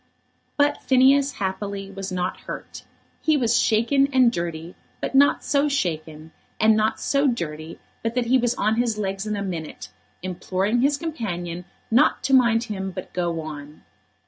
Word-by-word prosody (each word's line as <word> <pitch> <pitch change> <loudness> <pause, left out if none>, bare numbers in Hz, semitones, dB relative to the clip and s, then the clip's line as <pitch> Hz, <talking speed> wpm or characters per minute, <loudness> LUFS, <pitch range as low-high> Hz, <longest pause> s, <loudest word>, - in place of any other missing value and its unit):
But 290 0 +2
Phineas, 270 +2 +4
happily, 195 -2 -4
was 195 -1 -6
not 180 0 -2
hurt. - - -8 0.4
He 310 -1 +3
was 240 -2 +2
shaken 235 +5 +3
and 255 -3 +5
dirty, 170 -3 -4 0.3
but - - -4
not 280 +1 +4
so 290 0 +1
shaken, 160 - -3 0.3
and 220 0 +5
not 220 +1 +1
so 280 0 +1
dirty, 160 - -4 0.2
but 230 +1 -3
that 250 -1 +1
he 255 +2 +3
was 240 0 0
on 220 +1 +1
his 235 -3 0
legs 195 0 -3
in 210 - -1
a 200 - -3
minute, 160 - -6 0.3
imploring 185 +5 -1
his 280 +2 +2
companion 180 - -4 0.3
not 250 +7 +3
to 270 - 0
mind 235 -3 +4
him 195 -4 -4
but 185 -1 -8
go 170 -2 -1
on. 150 -1 -9
215 Hz, 165 wpm, -23 LUFS, 180-255 Hz, 0.4 s, and